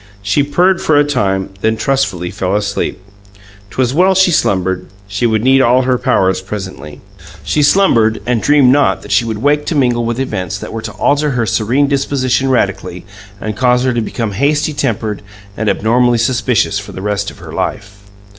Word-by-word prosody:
She 100 Hz, +8 st, +1 dB
purred 175 Hz, +6 st, +2 dB
for 155 Hz, -, +2 dB
a 145 Hz, -, +5 dB
time, 100 Hz, -10 st, -1 dB
then 110 Hz, 0 st, +1 dB
trustfully 110 Hz, -11 st, -1 dB
fell 95 Hz, +1 st, -2 dB
asleep. 100 Hz, -1 st, -2 dB, 0.7 s
'Twas 125 Hz, +5 st, -1 dB
well 185 Hz, +5 st, +3 dB
she 190 Hz, -1 st, +4 dB
slumbered; 95 Hz, -, 0 dB, 0.2 s
she 105 Hz, +4 st, -1 dB
would 110 Hz, -1 st, 0 dB
need 135 Hz, +1 st, +4 dB
all 125 Hz, +1 st, +3 dB
her 125 Hz, -1 st, 0 dB
powers 95 Hz, -1 st, +1 dB
presently. 95 Hz, -7 st, -8 dB, 0.4 s
She 150 Hz, -, 0 dB
slumbered, 120 Hz, -, +3 dB
and 120 Hz, -2 st, 0 dB
dreamed 145 Hz, -3 st, +4 dB
not 145 Hz, +1 st, +2 dB
that -, -, -9 dB
she 120 Hz, -, +3 dB
would 110 Hz, 0 st, -4 dB
wake 145 Hz, +1 st, +1 dB
to 165 Hz, -, -1 dB
mingle 125 Hz, -4 st, +1 dB
with 115 Hz, +1 st, -2 dB
events 95 Hz, -9 st, -3 dB
that -, -, -8 dB
were 115 Hz, -, -4 dB
to -, -, -6 dB
alter 145 Hz, +1 st, +1 dB
her 125 Hz, -4 st, -1 dB
serene 120 Hz, +7 st, +1 dB
disposition 135 Hz, -2 st, 0 dB
radically 95 Hz, -7 st, -1 dB, 0.3 s
and 110 Hz, 0 st, -4 dB
cause 125 Hz, +1 st, +2 dB
her 130 Hz, -1 st, +1 dB
to 120 Hz, -, 0 dB
become 115 Hz, 0 st, -3 dB
hasty 145 Hz, +8 st, 0 dB
tempered 110 Hz, -6 st, -2 dB, 0.3 s
and 110 Hz, 0 st, -1 dB
abnormally 120 Hz, +2 st, +2 dB
suspicious 120 Hz, -3 st, 0 dB
for 100 Hz, -, -10 dB
the 95 Hz, -, -7 dB
rest 105 Hz, -1 st, -2 dB
of -, -, -14 dB
her -, -, -11 dB
life. 100 Hz, 0 st, -4 dB
120 Hz, 185 wpm, -14 LUFS, 105-135 Hz, 0.7 s, a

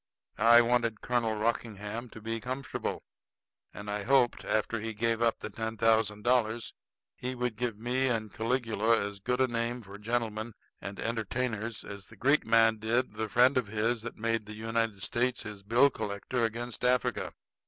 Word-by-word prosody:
I 120 Hz, +2 st, +8 dB
wanted 115 Hz, -2 st, +1 dB
Colonel 115 Hz, -3 st, 0 dB
Rockingham 110 Hz, +1 st, -2 dB
to 110 Hz, -, -11 dB
be 115 Hz, +1 st, -3 dB
comfortable; 130 Hz, +2 st, -4 dB, 0.7 s
and 105 Hz, -, -9 dB
I 105 Hz, 0 st, -2 dB
hoped 130 Hz, +2 st, +3 dB
after 110 Hz, +1 st, 0 dB
he 110 Hz, 0 st, -4 dB
gave 115 Hz, +1 st, 0 dB
up 115 Hz, -1 st, +3 dB
the -, -, -7 dB
ten 110 Hz, +1 st, -4 dB
thousand 110 Hz, -2 st, +2 dB
dollars 120 Hz, -2 st, +1 dB, 0.4 s
he 125 Hz, +1 st, -4 dB
would 125 Hz, -2 st, -2 dB
give 120 Hz, -1 st, -2 dB
me 125 Hz, +4 st, 0 dB
and 110 Hz, -4 st, -1 dB
Caligula 115 Hz, -1 st, +1 dB
as 100 Hz, 0 st, -4 dB
good 125 Hz, +5 st, -1 dB
a 130 Hz, -, +4 dB
name 120 Hz, 0 st, -2 dB
for 100 Hz, 0 st, -11 dB
gentlemen 110 Hz, 0 st, -2 dB, 0.3 s
and 100 Hz, +2 st, -6 dB
entertainers 115 Hz, -1 st, -2 dB
as 100 Hz, -2 st, -9 dB
the -, -, -14 dB
Greek 140 Hz, 0 st, +3 dB
man 115 Hz, 0 st, +5 dB
did 115 Hz, +2 st, 0 dB
the 110 Hz, 0 st, -3 dB
friend 125 Hz, +5 st, +5 dB
of 120 Hz, -, -4 dB
his 110 Hz, +2 st, 0 dB
that 120 Hz, +1 st, -7 dB
made 115 Hz, -1 st, -1 dB
the 105 Hz, -, -7 dB
United 115 Hz, -2 st, -1 dB
States 125 Hz, 0 st, 0 dB
his 105 Hz, -2 st, -7 dB
bill 120 Hz, +7 st, +4 dB
collector 110 Hz, +3 st, -2 dB
against 120 Hz, +2 st, -4 dB
Africa. 125 Hz, 0 st, +1 dB
115 Hz, 175 wpm, -30 LUFS, 110-120 Hz, 0.7 s, I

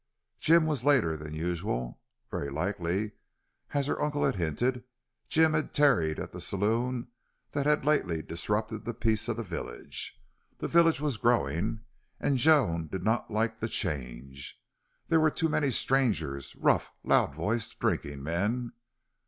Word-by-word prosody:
Jim 165 Hz, 0 st, +5 dB
was 150 Hz, -5 st, -1 dB
later 130 Hz, -, +3 dB
than 75 Hz, 0 st, -7 dB
usual. 80 Hz, -, -3 dB, 0.3 s
Very 70 Hz, -, -3 dB
likely, 90 Hz, +6 st, -1 dB, 0.6 s
as 140 Hz, -1 st, +2 dB
her 145 Hz, -, -1 dB
uncle 150 Hz, -1 st, 0 dB
had -, -, +1 dB
hinted, 120 Hz, -, -1 dB, 0.5 s
Jim 160 Hz, 0 st, +4 dB
had 155 Hz, -2 st, -1 dB
tarried 85 Hz, -, +4 dB
at -, -, -5 dB
the -, -, -8 dB
saloon 115 Hz, +5 st, 0 dB, 0.4 s
that 145 Hz, 0 st, -1 dB
had 150 Hz, -2 st, +2 dB
lately 90 Hz, -, +1 dB
disrupted 105 Hz, +5 st, -2 dB
the 115 Hz, +1 st, -4 dB
peace 110 Hz, 0 st, +1 dB
of 115 Hz, -, -1 dB
the 115 Hz, -, -2 dB
village. 90 Hz, -5 st, -6 dB, 0.4 s
The -, -, -3 dB
village 165 Hz, -3 st, +4 dB
was 145 Hz, -6 st, 0 dB
growing, 105 Hz, -, +1 dB, 0.4 s
and 135 Hz, -3 st, +1 dB
Joan 120 Hz, -, +4 dB
did 95 Hz, +2 st, -5 dB
not 110 Hz, +3 st, +1 dB
like 115 Hz, +1 st, -1 dB
the 110 Hz, -, -2 dB
change. 70 Hz, -, -4 dB, 0.5 s
There 165 Hz, -, +4 dB
were 155 Hz, 0 st, +5 dB
too 160 Hz, +1 st, 0 dB
many 145 Hz, -2 st, +1 dB
strangers, 105 Hz, -, 0 dB
rough, -, -, +2 dB
loud -, -, +3 dB
voiced, 105 Hz, +8 st, -2 dB
drinking 70 Hz, -1 st, -1 dB
men. 105 Hz, -, -1 dB
110 Hz, 150 wpm, -29 LUFS, 85-135 Hz, 0.6 s, Jim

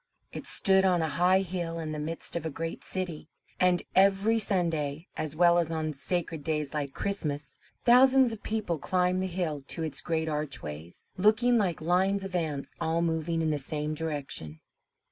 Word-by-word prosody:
It -, -, -6 dB
stood 190 Hz, -1 st, +3 dB
on 180 Hz, -3 st, +3 dB
a -, -, 0 dB
high 180 Hz, +6 st, +3 dB
hill 175 Hz, -3 st, -3 dB
in 160 Hz, -2 st, -4 dB
the 155 Hz, -, -4 dB
midst 165 Hz, +3 st, -4 dB
of 170 Hz, -, -2 dB
a 160 Hz, -, -2 dB
great 165 Hz, +2 st, -5 dB
city; 180 Hz, -4 st, -4 dB, 0.3 s
and 180 Hz, -1 st, +3 dB
every 195 Hz, +4 st, +4 dB
Sunday, 165 Hz, -7 st, 0 dB
as 155 Hz, -1 st, -3 dB
well 175 Hz, +1 st, +5 dB
as 165 Hz, -2 st, 0 dB
on 155 Hz, -1 st, -2 dB
sacred 165 Hz, +1 st, -3 dB
days 150 Hz, -2 st, -2 dB
like 145 Hz, -3 st, -3 dB
Christmas, 150 Hz, -7 st, -3 dB, 0.3 s
thousands 255 Hz, 0 st, +6 dB
of 220 Hz, -, -8 dB
people 215 Hz, -7 st, -2 dB
climbed 180 Hz, +3 st, +1 dB
the 190 Hz, -, -1 dB
hill 170 Hz, -5 st, -2 dB
to 165 Hz, -, -2 dB
its 155 Hz, -3 st, -3 dB
great 160 Hz, -1 st, -1 dB
archways, 85 Hz, -, -5 dB
looking 225 Hz, +5 st, +4 dB
like 180 Hz, -7 st, -1 dB
lines 190 Hz, +4 st, +2 dB
of 195 Hz, -1 st, -6 dB
ants 155 Hz, -5 st, -2 dB
all 165 Hz, +1 st, +1 dB
moving 165 Hz, 0 st, 0 dB
in 160 Hz, -, +1 dB
the 150 Hz, -, 0 dB
same 150 Hz, +2 st, -3 dB
direction. 145 Hz, -, -4 dB
165 Hz, 180 wpm, -29 LUFS, 155-185 Hz, 0.3 s, thousands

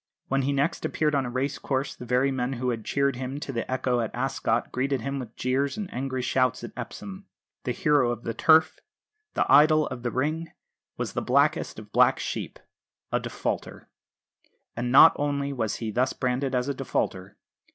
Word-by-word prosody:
When 135 Hz, +1 st, +2 dB
he 135 Hz, +2 st, 0 dB
next 140 Hz, +3 st, 0 dB
appeared 150 Hz, -1 st, 0 dB
on 135 Hz, -3 st, +1 dB
a -, -, -4 dB
race 135 Hz, +3 st, -2 dB
course 135 Hz, 0 st, -2 dB
the 125 Hz, -, -10 dB
very 125 Hz, +3 st, +2 dB
men 130 Hz, 0 st, -1 dB
who 125 Hz, 0 st, -2 dB
had 115 Hz, -2 st, -4 dB
cheered 140 Hz, 0 st, 0 dB
him 130 Hz, +2 st, -4 dB
to 135 Hz, -, -5 dB
the 115 Hz, +1 st, -3 dB
echo 125 Hz, -1 st, 0 dB
at 115 Hz, -2 st, -1 dB
Ascot 120 Hz, -2 st, -1 dB
greeted 135 Hz, 0 st, -1 dB
him 140 Hz, +3 st, -3 dB
with 120 Hz, -3 st, -8 dB
jeers 135 Hz, -, 0 dB
and 205 Hz, -3 st, -5 dB
angry 130 Hz, 0 st, -3 dB
shouts 130 Hz, -1 st, +1 dB
at 120 Hz, -, -6 dB
Epsom. 190 Hz, -, -8 dB, 0.4 s
The 125 Hz, -, 0 dB
hero 145 Hz, -1 st, +2 dB
of 120 Hz, -1 st, -4 dB
the 115 Hz, -, -3 dB
Turf, 160 Hz, +5 st, +4 dB, 0.6 s
the -, -, +2 dB
idol 155 Hz, +1 st, +6 dB
of 125 Hz, -2 st, -6 dB
the 120 Hz, -, -1 dB
Ring, 155 Hz, +6 st, -2 dB, 0.4 s
was -, -, -3 dB
that -, -, -1 dB
blackest -, -, +2 dB
of -, -, -11 dB
black -, -, +4 dB
sheep, -, -, -4 dB, 0.5 s
a -, -, +2 dB
defaulter! -, -, -4 dB, 0.9 s
And 120 Hz, +1 st, -2 dB
not 145 Hz, +4 st, +9 dB
only 140 Hz, -1 st, -1 dB
was 115 Hz, -5 st, -1 dB
he 110 Hz, -2 st, -4 dB
thus 125 Hz, +5 st, +1 dB
branded 130 Hz, +1 st, -1 dB
as 125 Hz, +1 st, 0 dB
a 140 Hz, -, 0 dB
defaulter. 95 Hz, -8 st, -3 dB
130 Hz, 195 wpm, -26 LUFS, 125-140 Hz, 0.9 s, not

